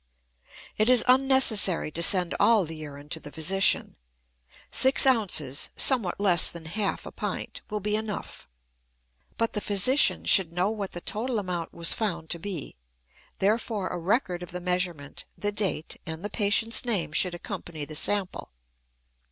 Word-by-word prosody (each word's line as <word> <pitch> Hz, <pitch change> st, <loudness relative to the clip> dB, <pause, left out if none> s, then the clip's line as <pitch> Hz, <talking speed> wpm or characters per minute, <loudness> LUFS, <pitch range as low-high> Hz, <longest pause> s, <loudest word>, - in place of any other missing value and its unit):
It 215 Hz, +3 st, +3 dB
is 255 Hz, -2 st, +5 dB
unnecessary 255 Hz, -, +4 dB
to 170 Hz, -, -3 dB
send 180 Hz, 0 st, +5 dB
all 220 Hz, -5 st, +4 dB
the 160 Hz, +1 st, -8 dB
urine 145 Hz, -2 st, -10 dB
to 160 Hz, -, 0 dB
the 145 Hz, -, -12 dB
physician; 190 Hz, +6 st, 0 dB, 0.7 s
six 265 Hz, +1 st, +6 dB
ounces, 185 Hz, -, +1 dB
somewhat 230 Hz, -11 st, +2 dB
less 185 Hz, -4 st, +4 dB
than 170 Hz, -2 st, -10 dB
half 200 Hz, +5 st, -3 dB
a -, -, -8 dB
pint, -, -, -6 dB
will 210 Hz, -1 st, -4 dB
be 210 Hz, +2 st, -1 dB
enough. 215 Hz, -1 st, -6 dB, 0.9 s
But 230 Hz, 0 st, -1 dB
the 210 Hz, -, -2 dB
physician 205 Hz, +9 st, +2 dB
should 185 Hz, -5 st, +4 dB
know 180 Hz, +4 st, 0 dB
what 205 Hz, -3 st, -6 dB
the 175 Hz, -, -6 dB
total 235 Hz, +6 st, -2 dB
amount 180 Hz, -5 st, -4 dB
was 170 Hz, -1 st, 0 dB
found 170 Hz, -8 st, -4 dB
to 170 Hz, -, -2 dB
be; 170 Hz, -, -7 dB, 0.6 s
therefore, 210 Hz, -1 st, -1 dB
a 180 Hz, -, -5 dB
record 180 Hz, -1 st, -1 dB
of 175 Hz, -, -8 dB
the 180 Hz, -, -6 dB
measurement, 180 Hz, -5 st, -3 dB
the 205 Hz, -, -2 dB
date, 200 Hz, -6 st, -3 dB
and 160 Hz, +3 st, -6 dB
the 205 Hz, -, -5 dB
patient's 220 Hz, +2 st, +1 dB
name 210 Hz, -10 st, -1 dB
should 175 Hz, +2 st, 0 dB
accompany 175 Hz, -4 st, -7 dB
the 155 Hz, -, -10 dB
sample. 195 Hz, +4 st, -2 dB
190 Hz, 160 wpm, -26 LUFS, 170-215 Hz, 0.9 s, six